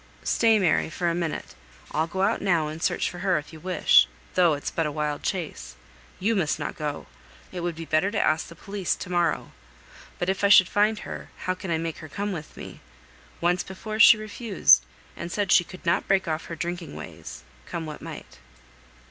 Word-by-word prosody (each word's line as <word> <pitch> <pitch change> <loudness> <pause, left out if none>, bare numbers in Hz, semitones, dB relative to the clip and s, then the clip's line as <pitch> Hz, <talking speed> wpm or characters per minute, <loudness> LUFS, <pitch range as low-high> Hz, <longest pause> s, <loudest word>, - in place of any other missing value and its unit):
"Stay, 225 -2 +3
Mary, 180 -5 +2
for 175 +2 -1
a - - -1
minute; 170 -2 -3 0.4
I'll 160 +2 0
go 190 +3 -2
out 210 +3 +1
now 175 -6 +2
and 155 +1 -7
search - - +1
for 175 - -6
her 185 -2 +2
if 150 +1 -7
you 160 - -10
wish, 180 - +4 0.3
though 175 -4 +4
it's 145 - -5
but 165 -2 0
a - - -3
wild 150 -1 -2
chase. 180 -6 -4 0.4
You 225 +4 +1
must 170 -7 +1
not - - -4
go. 150 -2 -4 0.5
It 185 - -5
would 175 -1 -2
be 165 0 -7
better 155 +5 +2
to 205 - -1
ask 155 +1 +1
the 170 - -12
police 195 -1 -2
to 180 - -8
morrow. 175 -1 0 0.7
But 175 - -2
if 190 +1 -1
I 200 - +5
should 185 -3 +8
find 210 +1 +2
her, - - -8 0.2
how 185 - +1
can 185 0 -8
I 165 - +1
make 165 -1 -4
her 155 - -10
come 205 +7 -3
with 160 -5 -7
me? - - -9 0.6
Once 175 +1 +2
before 215 +3 -6
she 225 - +9
refused, 215 - +3 0.3
and 170 +1 -6
said 200 -2 -1
she - - +6
could 180 +1 -13
not 170 - +1
break 190 -2 +2
off 160 0 -2
her 165 - -6
drinking 175 -3 -5
ways, - - -9 0.2
come 165 - -4
what 150 -1 -8
might?" 60 - -10
175 Hz, 210 wpm, -25 LUFS, 160-195 Hz, 0.7 s, she